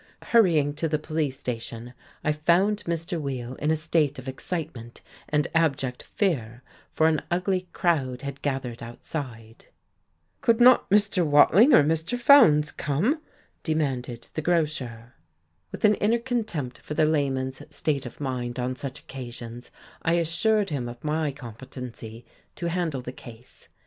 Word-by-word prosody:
Hurrying 165 -11 +3
to 165 - 0
the 155 - +1
police 155 -3 -2
station, 120 0 -5 0.3
I 150 - +2
found 175 +7 +2
Mr. 170 0 -2
Weill 130 -3 -4
in 150 - -1
a 160 - +3
state 155 -2 0
of 130 0 -9
excitement 130 -4 -6 0.3
and 150 -1 +1
abject 140 -6 +1
fear, 125 - -2 0.3
for 160 - +2
an 155 -2 +2
ugly 185 +1 0
crowd 135 -8 0
had 140 0 -6
gathered 130 -4 -3
outside. 115 -2 -7 0.7
"Could 230 0 +3
not 250 +1 +6
Mr. 200 -2 +3
Watling 165 - +6
or 245 - +7
Mr. 160 +9 0
Fowndes 230 - +6
come?" 195 - 0 0.4
demanded 130 -7 -2
the 155 - -2
grocer. 145 -8 -1 0.6
With - - -1
an 210 - +6
inner 215 +3 +2
contempt 220 - -3
for 150 - -7
the 155 - +4
layman's 135 -3 0
state 145 -3 -2
of 120 - -12
mind 125 -3 -3
on 125 +1 -2
such 135 +2 -6
occasions 120 -2 -8 0.3
I 165 - +1
assured 175 +5 +2
him 125 -5 -2
of 120 +1 -11
my 155 0 0
competency 120 -3 -9 0.3
to 170 -2 -3
handle 165 -6 -1
the 125 - -6
case. 120 -1 -13
150 Hz, 145 wpm, -26 LUFS, 125-170 Hz, 0.7 s, or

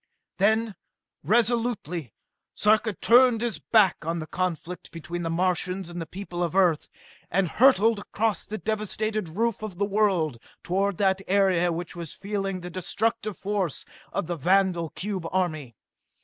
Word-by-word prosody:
Then, 220 +2 +2 0.5
resolutely, 220 - 0 0.4
Sarka 215 +1 +3
turned 235 +4 +5
his 235 -3 -2
back 210 -5 +4
on 165 +2 -2
the 160 - -4
conflict 180 0 -4
between 165 +2 -6
the 165 - -2
Martians 180 +1 -1
and 175 0 -5
the 165 - -6
people 180 0 -6
of 175 0 -1
Earth, 180 -5 +3 0.4
and 190 +1 +1
hurtled 225 0 +4
across 210 -1 -1
the 215 - -4
devastated 215 -2 -2
roof 230 -2 0
of 210 -5 -6
the 200 - +1
world 190 - +1 0.2
toward 195 +1 0
that 195 -1 +2
area 185 -3 +3
which 170 +1 -5
was 170 -3 -7
feeling 195 -2 -3
the 180 0 -7
destructive 215 +3 -2
force 195 -6 -2 0.3
of - - -2
the 175 +1 -3
vandal 180 0 +2
cube 185 +2 -4
army. 155 -10 -2
190 Hz, 150 wpm, -26 LUFS, 175-215 Hz, 0.5 s, turned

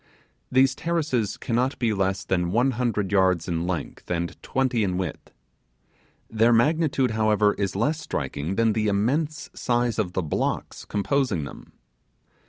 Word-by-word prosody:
These 130 0 +4
terraces 150 - -1
cannot 125 +3 0
be 115 -3 +1
less 95 -1 0
than 90 -2 0
one 125 +6 +3
hundred 115 -5 -1
yards 95 -4 +3
in 85 -1 -1
length 90 -3 -4
and 85 -1 -2
twenty 130 -4 0
in 90 -2 0
width. 90 -5 -4 1.0
Their 115 +1 +3
magnitude, 135 +1 +2
however, 110 -1 +3
is 100 -2 -2
less 145 +10 +1
striking 75 - -3
than 115 0 +3
the 110 0 0
immense 145 +10 0
size 120 -2 0
of 90 -4 -1
the 95 - -1
blocks 75 - -2
composing 105 - 0
them. 70 - -10
110 Hz, 145 wpm, -25 LUFS, 95-130 Hz, 1.0 s, These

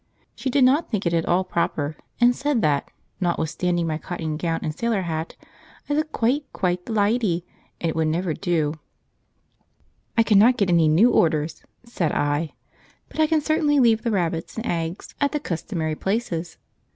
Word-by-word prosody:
She 265 - -3
did 265 +1 +3
not 275 +6 +3
think 210 -4 -2
it 170 - +1
at 165 -1 +1
all 180 +2 +3
proper, 160 -4 -1 0.2
and 245 0 +5
said 280 -6 0
that, 145 -2 +1 0.3
notwithstanding 175 0 0
my 155 -1 -2
cotton 160 -3 -4
gown 165 +1 -2
and 155 - -2
sailor 230 -3 0
hat, 160 -1 -4 0.5
I 290 - -1
looked 310 +1 0
quite, 270 +5 0
quite 180 -1 -1
the 225 - -3
lydy, 205 -5 +1 0.3
and 170 - -1
it - - -3
would 160 -1 +1
never 170 +1 0
do. 160 -4 0 1.4
"I 230 - +6
cannot 225 +3 +5
get 200 -5 +2
any 165 -2 +4
new 185 +11 +5
orders," 155 -5 +1 0.2
said 190 -9 -2
I, 145 +2 0 0.6
"but - - -10
I 310 - +5
can 315 0 +2
certainly 295 -1 +2
leave 230 -3 +4
the 235 - -1
rabbits 170 -4 -2
and 225 - -3
eggs 165 -1 -3
at 285 +1 +2
the 300 - 0
customary 165 - -3
places. 175 -3 -2
180 Hz, 175 wpm, -23 LUFS, 165-235 Hz, 1.4 s, I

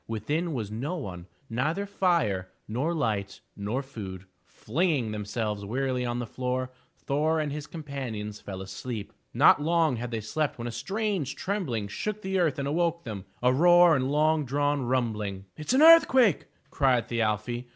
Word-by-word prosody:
Within 150 +10 -2
was 110 -4 -4
no 135 +11 -3
one, 90 - -7 0.2
neither 155 - -1
fire, 165 - +1 0.2
nor 130 +10 -1
light, 105 -11 -2 0.2
nor 105 +7 -2
food. 100 -8 -8 0.2
Flinging 140 -3 -1
themselves 105 0 -3
wearily 125 +3 -1
on 120 0 -2
the 120 - -3
floor, 130 +2 -3 0.3
Thor 155 +3 0
and 150 -2 -1
his 150 0 -5
companions 130 -10 -6
fell 95 -1 -6
asleep. 105 +3 -6 0.2
Not - - +5
long 160 -4 +2
had 120 +1 -4
they 115 -1 -3
slept 150 +8 -2
when 120 - -6
a 120 - -3
strange 190 - -2
trembling 155 - -2
shook 210 - -4
the 190 0 0
earth 160 -6 +1
and 140 0 -2
awoke 170 +2 0
them, 105 -4 -6
— - - -24
a 125 0 +4
roar 175 +3 +6
and 130 0 0
long 155 +1 +3
drawn 145 +2 0
rumbling. 110 -6 -1
"It 155 - -9
is - - +2
an 285 - +5
earthquake!" 265 - +6 0.2
cried 130 -4 +2
Thi 115 -1 -1
al'fi. 115 +3 -1
130 Hz, 170 wpm, -27 LUFS, 110-160 Hz, 0.3 s, roar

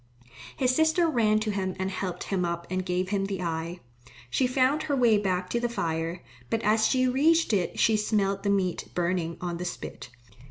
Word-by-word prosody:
His 255 -1 +2
sister 320 +3 +3
ran 220 -7 +2
to 215 -1 -1
him 190 -2 -2
and 190 0 -2
helped 185 -2 -4
him 190 -2 -1
up 170 0 -2
and 185 0 -1
gave 180 0 -1
him 195 -1 0
the 195 -2 -3
eye. 165 +1 -3 0.5
She 260 - +2
found 260 +4 +2
her 290 -2 -1
way 235 -5 +4
back 185 -2 -1
to 240 - +1
the 240 0 -1
fire, 165 -5 -3 0.3
but 225 - -1
as 220 +1 +3
she 255 +1 +2
reached 305 +3 +3
it 190 -4 0
she 220 -1 +4
smelled 200 -2 0
the 200 - -1
meat 190 -3 0
burning 170 -2 -1
on 175 -1 -3
the 180 - -5
spit. 175 - -7
200 Hz, 200 wpm, -27 LUFS, 180-240 Hz, 0.5 s, way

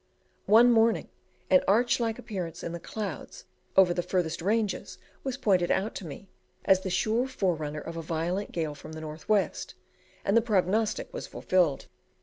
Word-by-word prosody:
One 230 +4 +7
morning 225 0 +3 0.4
an 275 - +6
arch 235 +6 +3
like 225 -2 -1
appearance 180 -7 -6
in 170 - -4
the 170 - -5
clouds 215 - -6 0.3
over 185 -2 +6
the 175 - -1
furthest 175 -3 -1
ranges 210 +2 -1 0.3
was 265 -2 -3
pointed 185 -4 +2
out 200 +4 0
to 180 - -7
me 160 +6 -9 0.4
as 190 - +5
the 190 - -3
sure 225 +7 +1
forerunner 155 - -2
of 165 +2 -7
a - - -3
violent 170 +5 -2
gale 160 -3 -2
from 155 +2 -11
the 160 - -7
north 155 +4 -9
west, 210 -2 0 0.5
and 200 - +2
the 230 - +6
prognostic 215 0 0
was - - -5
fulfilled. 175 -7 +1
190 Hz, 170 wpm, -28 LUFS, 165-220 Hz, 0.5 s, One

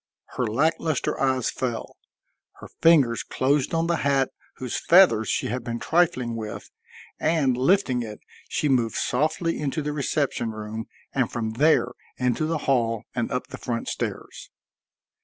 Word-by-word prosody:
Her 125 - 0
lack 145 +10 +1
luster 155 -5 -1
eyes 130 -2 +1
fell; 120 -3 -4 0.6
her - - -12
fingers 140 -9 +5
closed 135 +1 0
on 165 0 +1
the 170 0 +1
hat 140 -2 +1 0.2
whose 125 -2 -4
feathers 165 - +6
she - - 0
had 125 +2 -3
been 115 0 -3
trifling 160 -7 +1
with, 110 -2 -7 0.5
and, 155 -6 +2
lifting 130 -2 +2
it, 105 -2 -7 0.3
she 150 - 0
moved 120 -5 +1
softly 155 +5 0
into 150 +1 -2
the 150 0 -2
reception 140 -4 -1
room 110 +1 -6 0.3
and 130 -4 0
from 110 -2 -2
there 150 +8 +3 0.3
into 125 +4 0
the 165 0 0
hall 115 -5 +1
and 120 -2 -2
up 125 - -3
the - - -8
front 115 -2 -3
stairs. - - -5
130 Hz, 155 wpm, -25 LUFS, 115-155 Hz, 0.6 s, feathers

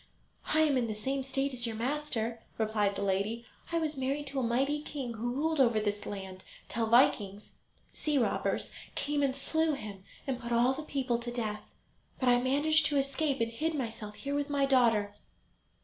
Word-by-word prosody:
"I 315 - +3
am 290 -4 +4
in 235 - 0
the 215 - -3
same 270 +6 -1
state 270 +1 -1
as 245 -1 0
your 225 - -3
master," 235 -2 -2 0.2
replied 215 -2 +1
the 200 - -2
lady; 200 +4 0 0.3
"I 335 - +1
was 315 -2 0
married 275 +2 -1
to 275 - -2
a - - 0
mighty 270 +5 +1
king 275 -5 -5
who 235 +2 -2
ruled 315 +2 0
over 235 -4 +5
this 205 -1 -2
land, 190 -2 -6 0.3
till 225 0 0
Vikings 210 -4 +3 0.4
[sea 300 -2 0
robbers] 245 - +1 0.2
came 290 0 0
and 270 -2 +1
slew 315 +3 +1
him 205 -8 -7 0.2
and 260 -3 -2
put 240 -1 -6
all 240 +2 +4
the 270 - -5
people 265 -5 -1
to 240 0 -5
death. 215 -3 -2 0.6
But 255 - +3
I 245 0 +5
managed 290 +4 +3
to 290 - +1
escape, 275 0 0
and 230 0 +1
hid 315 +7 -1
myself 225 -5 -4
here 280 +5 -4
with 285 0 -1
my 285 -1 +2
daughter." 230 -6 +3
255 Hz, 195 wpm, -31 LUFS, 225-285 Hz, 0.6 s, over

